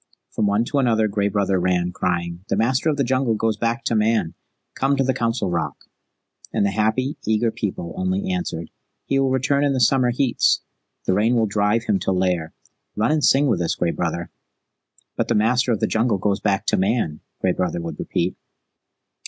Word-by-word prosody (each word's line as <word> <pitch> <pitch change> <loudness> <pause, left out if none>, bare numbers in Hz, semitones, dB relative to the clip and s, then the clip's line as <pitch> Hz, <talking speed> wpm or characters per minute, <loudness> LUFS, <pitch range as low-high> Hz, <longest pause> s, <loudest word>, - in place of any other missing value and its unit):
From 105 - 0
one 105 +3 +2
to 140 - 0
another 115 -4 +2
Gray 100 0 0
Brother 100 -2 +1
ran, 90 0 +1
crying, 85 -1 -2
"The - - +1
Master 130 +7 +1
of 150 - 0
the 140 - +2
Jungle 130 -2 +1
goes 110 0 0
back 115 +2 -1
to 115 - -1
Man! 110 -5 +1 0.4
Come 135 +1 +1
to 135 - +2
the 130 0 +1
Council 115 -6 -1
Rock." 85 -3 -1 0.8
And - - +1
the 100 - +1
happy, 110 +7 0
eager 110 +1 +2
People 95 -6 -4
only 185 +1 -1
answered, 175 - -3 0.3
"He 135 - +1
will 135 -1 +2
return 130 +2 +1
in 140 -1 +2
the 130 - 0
summer 125 0 +3
heats. 125 0 +2 0.4
The - - +2
Rains 110 +5 +2
will 115 -2 +3
drive 105 +2 +1
him 105 -4 +1
to - - -1
lair. 90 -3 0 0.4
Run 110 +7 +1
and 155 -1 +1
sing 140 +2 +4
with 110 -10 +1
us, 85 - 0
Gray 85 -1 0
Brother." 85 0 -3 0.9
"But - - 0
the - - +1
Master 125 +4 +2
of 110 - 0
the - - +3
Jungle 115 -1 +1
goes 100 +1 0
back 100 -2 0
to - - +1
Man," 95 -6 0 0.2
Gray 95 - +1
Brother 90 -1 -1
would 85 0 -6
repeat. 85 +2 -1
110 Hz, 200 wpm, -22 LUFS, 95-125 Hz, 0.9 s, sing